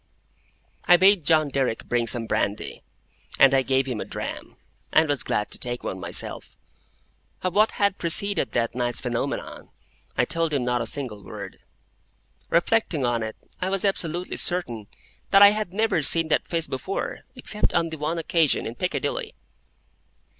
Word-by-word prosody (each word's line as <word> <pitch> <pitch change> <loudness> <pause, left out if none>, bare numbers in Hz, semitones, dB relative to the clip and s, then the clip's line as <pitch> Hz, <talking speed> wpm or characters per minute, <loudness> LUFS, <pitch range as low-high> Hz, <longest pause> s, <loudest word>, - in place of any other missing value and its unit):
I 175 - +7
bade 190 -1 +4
John 155 -2 +3
Derrick 130 -4 -1
bring 120 -1 0
some 120 -1 +1
brandy, 100 -1 -2 0.6
and 135 0 +6
I 135 - +4
gave 130 0 +1
him 125 -5 -4
a - - -2
dram, - - -7 0.4
and 160 - +4
was 145 -3 -1
glad 105 - -2
to - - -4
take 120 0 -4
one 95 - -4
myself. 85 0 -2 0.9
Of 185 -1 -1
what 215 +2 +3
had 200 -1 0
preceded 185 +3 +1
that 115 -1 0
night's 120 -1 -1
phenomenon, 120 -2 -4 0.5
I - - +3
told 165 -2 0
him 135 - 0
not 125 -1 0
a 115 - -2
single 115 -6 -3
word. 100 -2 -9 0.9
Reflecting 170 - +1
on 120 -1 0
it, 110 0 -5 0.3
I 185 - -1
was 195 +1 0
absolutely 180 -2 -1
certain 120 - -1 0.4
that 195 +1 +7
I 200 - +9
had 210 -3 -3
never 205 -3 +1
seen 165 +2 +6
that - - +1
face 165 -1 +1
before, 160 +9 -4 0.2
except 210 - -1
on 165 -1 +1
the 160 - -7
one 155 +3 -2
occasion 165 -2 +1
in - - -5
Piccadilly. - - -3
155 Hz, 165 wpm, -24 LUFS, 120-180 Hz, 0.9 s, I